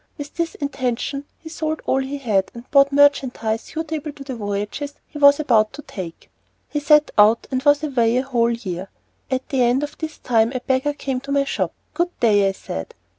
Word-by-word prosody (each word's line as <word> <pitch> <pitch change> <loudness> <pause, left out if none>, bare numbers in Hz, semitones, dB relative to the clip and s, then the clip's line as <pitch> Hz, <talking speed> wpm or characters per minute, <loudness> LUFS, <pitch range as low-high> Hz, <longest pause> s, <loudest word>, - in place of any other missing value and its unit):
With 290 0 -7
this 335 -1 -2
intention 275 0 -3
he 325 - -13
sold 315 -1 -3
all 265 - +2
he 270 +2 -3
had 215 -8 0
and 235 +1 -10
bought 275 -1 +5
merchandise 265 -6 +2
suitable 315 -1 -5
to 280 - -10
the 270 -1 -6
voyages 210 +7 -4
he 295 - -9
was 285 0 +7
about 225 -8 +3
to 295 +2 -9
make. 175 -4 -7 0.4
He 295 - -1
set 300 +1 +4
out, 215 +2 +5
and 255 -1 0
was 290 +2 +4
away 245 -5 +2
a 255 - +1
whole 240 -3 +1
year. 195 -6 -4 0.4
At 260 0 -2
the 265 -2 +1
end 245 +3 +3
of 290 - -5
this 315 -1 -5
time 230 0 +2
a - - 0
beggar 265 +3 0
came 270 -3 -3
to 275 +2 -8
my 280 0 +3
shop. 275 - -2 0.2
"Good 350 +1 -2
day," 205 -4 +4
I - - -3
said. 80 - -7
270 Hz, 205 wpm, -21 LUFS, 230-290 Hz, 0.4 s, was